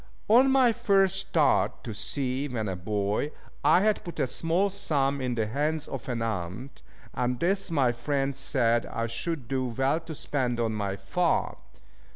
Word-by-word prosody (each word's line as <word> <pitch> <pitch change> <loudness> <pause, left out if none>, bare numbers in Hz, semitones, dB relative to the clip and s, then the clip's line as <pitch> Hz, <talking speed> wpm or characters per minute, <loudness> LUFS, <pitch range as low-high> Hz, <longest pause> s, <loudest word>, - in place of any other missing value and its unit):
On 250 +5 +6
my 260 -3 +4
first 195 -5 +2
start 160 -6 +2
to 115 - -5
sea 130 +5 -2
when 115 -5 -3
a 95 - -2
boy, 100 - -1 0.3
I 155 +5 +5
had 215 0 +1
put 170 - -8
a - - +3
small 170 +9 +1
sum 140 -8 0
in 125 -2 -1
the 110 -2 0
hands 150 +7 -1
of 135 -1 -6
an 120 -2 -1
aunt, 110 +5 -5 0.3
and 125 0 -1
this 195 +3 0
my 140 -7 +2
friend 135 +3 -1
said 120 -4 +1
I 115 - -3
should 125 +4 -4
do 130 0 -1
well 135 +6 0
to 165 -1 -8
spend 125 -5 -2
on 115 -1 0
my 100 -2 -2
farm. 165 - 0
135 Hz, 175 wpm, -27 LUFS, 115-165 Hz, 0.3 s, On